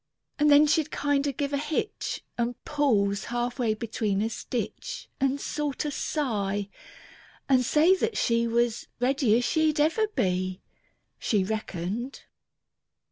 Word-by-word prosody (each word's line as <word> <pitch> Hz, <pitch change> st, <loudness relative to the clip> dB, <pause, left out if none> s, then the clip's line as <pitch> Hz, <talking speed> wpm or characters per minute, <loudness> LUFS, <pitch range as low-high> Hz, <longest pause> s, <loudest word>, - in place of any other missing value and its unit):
And 300 Hz, 0 st, +4 dB
then 290 Hz, +1 st, +7 dB
she'd 305 Hz, +1 st, +2 dB
kinder 285 Hz, 0 st, 0 dB
give 280 Hz, +2 st, -3 dB
a 280 Hz, -, +1 dB
hitch, 305 Hz, +7 st, -3 dB
And 240 Hz, 0 st, -1 dB
pause 205 Hz, -9 st, +1 dB
half 240 Hz, +1 st, -2 dB
way 225 Hz, -3 st, +1 dB
between 215 Hz, -3 st, -1 dB
a 225 Hz, -, -1 dB
stitch. 255 Hz, -, -5 dB
And 270 Hz, +1 st, +1 dB
sorter 295 Hz, 0 st, -2 dB
sigh, 205 Hz, -10 st, -1 dB, 0.8 s
and 260 Hz, -2 st, +4 dB
say 310 Hz, +8 st, +4 dB
that 455 Hz, +4 st, -1 dB
she 235 Hz, 0 st, +2 dB
Was 235 Hz, 0 st, 0 dB
ready 250 Hz, -3 st, +3 dB
as 245 Hz, -, 0 dB
she'd 315 Hz, 0 st, +2 dB
ever 325 Hz, +9 st, +3 dB
be. 185 Hz, -, -1 dB, 0.6 s
She 205 Hz, -4 st, +1 dB
reckoned. 215 Hz, +4 st, -4 dB
245 Hz, 135 wpm, -27 LUFS, 220-295 Hz, 0.8 s, then